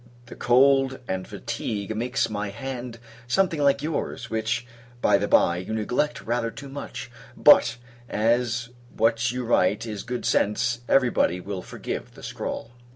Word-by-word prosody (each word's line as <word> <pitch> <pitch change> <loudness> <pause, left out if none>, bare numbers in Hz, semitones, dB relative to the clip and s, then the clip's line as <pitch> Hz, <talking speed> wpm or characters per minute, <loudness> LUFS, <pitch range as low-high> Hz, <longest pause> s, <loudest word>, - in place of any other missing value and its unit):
The 120 - -11
cold 135 +1 +4
and 95 0 -3
fatigue 105 0 -4
makes 125 +4 0
my 105 -1 -3
hand 120 +2 -6 0.3
something 165 +4 +1
like 140 0 +3
your's 150 -6 -3
which, 110 +2 -1 0.3
by 100 - +4
the 100 - -1
bye, 85 - +4
you 95 +5 -4
neglect 125 +7 -1
rather 115 0 -1
too 140 +4 -9
much: 135 -3 -7 0.3
but, 125 -5 +6 0.3
as 120 +2 +1 0.3
what 115 +1 +2
you 125 0 -3
write 105 -1 +2
is 105 -3 -5
good 125 0 -4
sense, 120 +3 +1
every 130 -3 +4
body 90 - +1
will 95 0 -5
forgive - - -6
the - - -13
scrawl. 115 - -5
120 Hz, 155 wpm, -25 LUFS, 110-125 Hz, 0.3 s, but